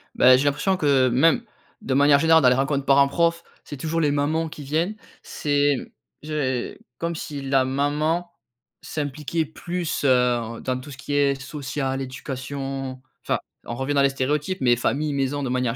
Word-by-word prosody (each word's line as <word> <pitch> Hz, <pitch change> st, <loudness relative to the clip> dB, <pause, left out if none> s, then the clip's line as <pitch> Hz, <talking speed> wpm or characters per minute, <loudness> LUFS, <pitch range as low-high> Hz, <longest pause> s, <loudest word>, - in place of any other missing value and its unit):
Beh, 130 Hz, 0 st, +7 dB
j'ai 135 Hz, -, 0 dB
l'impression 150 Hz, +7 st, +1 dB
que 135 Hz, -5 st, +3 dB
même, 165 Hz, -, +3 dB, 0.4 s
de 130 Hz, -, -2 dB
manière 140 Hz, +1 st, +5 dB
générale 160 Hz, +1 st, +5 dB
dans 125 Hz, -, +7 dB
les 125 Hz, -, +3 dB
rencontres 135 Hz, +1 st, 0 dB
parents-profs, 165 Hz, +5 st, +3 dB, 0.2 s
c'est 145 Hz, -, -8 dB
toujours 165 Hz, +4 st, -1 dB
les 150 Hz, -2 st, +2 dB
mamans 155 Hz, +3 st, 0 dB
qui 150 Hz, -, -9 dB
viennent. 160 Hz, +9 st, -1 dB, 0.3 s
C'est 145 Hz, -1 st, +1 dB, 0.5 s
j'ai 140 Hz, -5 st, -2 dB, 0.2 s
comme 170 Hz, +2 st, -3 dB
si 145 Hz, -2 st, -6 dB
la 135 Hz, -1 st, +2 dB
maman 150 Hz, +6 st, 0 dB, 0.5 s
s'impliquait 150 Hz, +2 st, -3 dB
plus, 170 Hz, +1 st, -4 dB
heu, 120 Hz, -3 st, +2 dB
dans 130 Hz, -1 st, -2 dB
tout 140 Hz, +3 st, -10 dB
ce 130 Hz, -, -10 dB
qui 140 Hz, +1 st, -5 dB
est 140 Hz, -1 st, +2 dB
social, 135 Hz, -1 st, -4 dB
éducation, 135 Hz, 0 st, -5 dB, 0.2 s
enfin, -, -, 0 dB, 0.3 s
on 120 Hz, -, -5 dB
revient 135 Hz, +3 st, -2 dB
dans 140 Hz, -, +3 dB
les 140 Hz, -, +4 dB
stéréotypes 150 Hz, +7 st, -1 dB
mais 120 Hz, -2 st, +4 dB
famille, 145 Hz, +5 st, -1 dB
maison 140 Hz, +1 st, -1 dB
de 130 Hz, -, -2 dB
manière 125 Hz, -2 st, 0 dB
140 Hz, 170 wpm, -23 LUFS, 130-155 Hz, 0.5 s, Beh